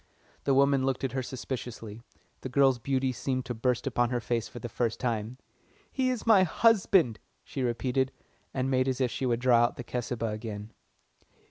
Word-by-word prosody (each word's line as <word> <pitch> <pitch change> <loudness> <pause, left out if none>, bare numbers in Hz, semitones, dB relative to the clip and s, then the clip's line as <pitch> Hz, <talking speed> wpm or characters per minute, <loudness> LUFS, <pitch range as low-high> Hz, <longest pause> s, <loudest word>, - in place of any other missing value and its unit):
The 135 - +3
woman 140 0 +4
looked 135 -1 -1
at 135 - 0
her 130 +1 -1
suspiciously 120 -4 -6 0.4
the 130 - -6
girl's 135 -1 +4
beauty 130 +2 0
seemed 130 +1 -2
to 125 - -3
burst 120 +1 0
upon 120 -2 +1
her 125 -1 0
for 120 0 -3
the 120 - -5
first 115 -1 -2
time. 115 -1 -2 0.5
"He 260 -1 +1
is 250 -4 -2
my 220 -4 +6
husband," 185 - +3 0.2
she 135 - -5
repeated, 130 +2 0 0.4
and 130 0 -1
made 130 0 +2
as 130 -1 -1
if 125 -2 +1
she 130 - -2
would 120 -1 0
draw 125 -2 +5
out 120 0 +3
the 125 - -5
Cesubah 120 -2 -3
again. 105 -1 -6
125 Hz, 185 wpm, -29 LUFS, 120-135 Hz, 0.5 s, my